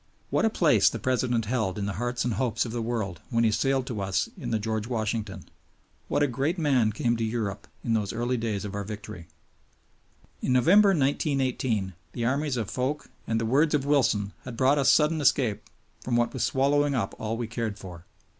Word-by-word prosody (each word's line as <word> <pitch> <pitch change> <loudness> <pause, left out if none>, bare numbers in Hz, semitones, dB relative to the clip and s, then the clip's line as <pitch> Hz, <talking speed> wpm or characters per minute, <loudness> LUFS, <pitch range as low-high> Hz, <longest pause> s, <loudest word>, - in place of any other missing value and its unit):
What - - +2
a - - +4
place 170 -8 +4
the - - -5
President 125 -3 0
held 110 -5 -1
in 100 - -2
the 100 - -2
hearts 120 0 -1
and 120 - 0
hopes 125 0 0
of 115 - -5
the 120 0 -3
world 110 -7 -3
when 115 0 +1
he 110 - +3
sailed 135 +3 +1
to 115 -5 -4
us 95 -1 0
in - - -6
the 115 - +1
George 110 0 -2
Washington! 110 -2 -3 0.6
What 145 - +1
a - - +3
great 140 +8 -1
man 135 -9 +2
came 120 +3 0
to 115 - -2
Europe 110 -3 -3 0.2
in 115 - 0
those 105 -3 0
early 120 +2 -1
days 110 -4 -2
of 100 - -6
our 100 0 -3
victory! 100 -5 -8 1.1
In 125 - +1
November, 190 - +6
1918, 135 - 0 0.2
the 120 - -2
armies 140 +1 0
of 110 -4 -3
Foch 130 +4 -2 0.2
and 115 0 0
the 115 - -1
words 150 +6 +3
of 140 -2 0
Wilson 120 -8 +2
had 125 -3 -8
brought 135 +3 +3
us 135 - +4
sudden 155 0 +4
escape 130 -6 +2 0.4
from 125 - -1
what 120 0 +1
was 130 -4 -2
swallowing 140 +4 +2
up 115 -6 -1
all 110 +1 -2
we 120 - -2
cared 115 -2 -3
for. 90 -3 -11
120 Hz, 205 wpm, -27 LUFS, 110-135 Hz, 1.1 s, November